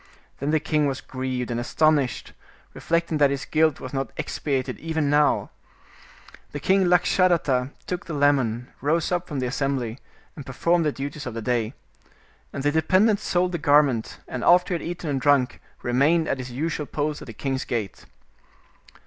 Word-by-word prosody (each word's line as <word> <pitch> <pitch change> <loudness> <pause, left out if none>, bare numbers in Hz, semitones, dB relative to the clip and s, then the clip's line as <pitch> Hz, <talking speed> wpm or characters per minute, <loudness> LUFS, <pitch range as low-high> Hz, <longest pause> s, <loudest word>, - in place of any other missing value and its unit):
Then 140 - -2
the 155 0 +3
king 150 -1 +1
was 135 -1 -2
grieved 130 -2 -4
and 120 - -1
astonished, 145 +1 +1 0.4
reflecting 170 -2 -1
that 145 -1 +5
his 140 0 -3
guilt 155 -2 +2
was 130 - -8
not 135 0 -2
expiated 135 -4 -2
even 160 -3 -1
now. 150 0 +2 1.0
The 145 - -4
king 190 +5 +3
Lakshadatta 175 -7 +2 0.2
took 180 -1 -4
the 165 - -4
lemon, 130 -4 +1
rose 160 +5 +1
up 180 0 -1
from 145 -4 -4
the - - -1
assembly, 130 -2 -2 0.4
and 145 - -8
performed 170 +6 +1
the 150 - +2
duties 140 +1 -6
of 120 - -6
the 115 - -3
day. 120 0 -1 0.8
And 140 - -5
the 145 - +2
dependent 185 +7 +3
sold 180 -3 0
the 175 - -3
garment, 145 -6 +3
and 125 - -5
after 180 +1 +4
he 170 - -1
had - - -5
eaten 175 -1 -5
and 140 -3 -1
drunk, 140 -3 +2 0.2
remained 145 +7 +2
at 135 - -1
his 130 0 -6
usual 150 +3 -3
post 150 0 -2
at - - -10
the - - -7
king's 135 +2 -2
gate. 110 -6 -4
145 Hz, 175 wpm, -24 LUFS, 130-160 Hz, 1.0 s, that